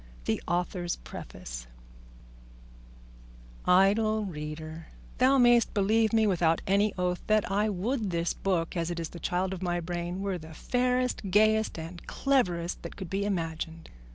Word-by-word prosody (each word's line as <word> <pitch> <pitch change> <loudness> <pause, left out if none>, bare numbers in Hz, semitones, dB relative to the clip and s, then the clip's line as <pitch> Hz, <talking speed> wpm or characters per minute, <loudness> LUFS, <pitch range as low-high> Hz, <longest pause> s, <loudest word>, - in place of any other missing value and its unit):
THE - - 0
AUTHOR'S 175 0 -1
PREFACE - - -8 2.0
Idle 210 +4 +4
reader: 155 -1 -6 0.3
thou 260 +2 +5
mayest 240 -2 +5
believe 215 +2 +3
me 225 -1 +4
without 170 -5 +2
any 200 +2 +3
oath 180 0 0
that 215 -2 +2
I 205 +2 +2
would 215 +3 -1
this 170 -1 0
book, 180 -3 -1
as 170 -1 -1
it 170 -1 -3
is 165 - -3
the 170 - -9
child 180 +3 -1
of 185 - -6
my 175 -1 0
brain, 175 +2 -4
were 195 -3 -2
the 160 0 -11
fairest, 250 -2 0
gayest, 215 +2 +3
and 165 +2 -8
cleverest 180 -11 0
that - - -8
could 190 -4 -7
be 195 +1 0
imagined. 165 -3 -3
185 Hz, 150 wpm, -29 LUFS, 170-215 Hz, 2.0 s, thou